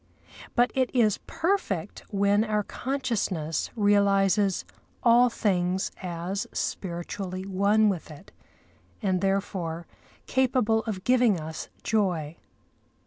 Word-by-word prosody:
But 245 +1 +3
it 260 -1 +1
is 220 -5 +3
perfect 320 - -1
when 200 +1 +2
our 210 -2 0
consciousness 210 - -2
realises 200 -2 +3 0.4
all 245 +1 +6
things 185 -4 0
as 180 +2 -3
spiritually 185 +1 -4
one 200 +3 +3
with 185 -6 -2
it, 155 +6 -13 0.7
and 185 -2 +1
therefore 190 -4 -1 0.4
capable 245 -4 +2
of 200 -5 -4
giving 245 -6 +3
us 155 0 -6
joy. 175 -8 0
200 Hz, 100 wpm, -27 LUFS, 180-225 Hz, 0.7 s, all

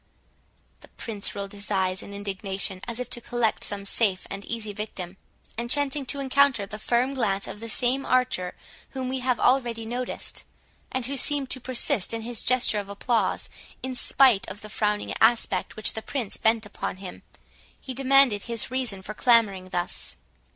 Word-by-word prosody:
The - - -15
Prince 210 -4 -5
rolled 200 -1 -4
his 205 0 -6
eyes 190 -2 +1
in - - -10
indignation, 195 -1 -3
as 235 0 -3
if 250 - -3
to 240 - +1
collect 235 -2 0
some 200 -1 -1
safe 195 -2 +2
and 200 0 -5
easy 220 -3 -4
victim; 195 -3 -6 0.4
and 235 0 -3
chancing 285 0 +1
to 280 - 0
encounter 275 -5 +3
the 215 +2 -7
firm 245 +4 +1
glance 200 -7 0
of - - -7
the 230 +1 -7
same 250 +5 +2
archer 250 -10 +1 0.4
whom 260 -1 -2
we 260 0 -1
have 250 -1 0
already 240 -3 +2
noticed, 245 +2 -3 0.5
and 260 -2 -2
who 275 +2 -2
seemed 280 0 +2
to 260 - +2
persist 250 -3 +1
in 225 - -4
his 235 -1 -1
gesture 250 -4 +3
of 200 -1 -6
applause, 225 +4 0 0.4
in 260 0 -3
spite 250 -3 +4
of 190 +2 -8
the 215 - -9
frowning 210 -1 0
aspect 220 -4 +3
which 215 - +1
the 220 - -4
Prince 235 -4 -3
bent 225 0 +2
upon 205 -2 -5
him, 185 -1 -9 0.6
he 260 - -6
demanded 270 -4 +4
his 235 -1 -1
reason 240 -7 -2
for 210 - -6
clamouring 210 -6 +3
thus. 175 +1 -3
230 Hz, 180 wpm, -26 LUFS, 200-255 Hz, 0.6 s, spite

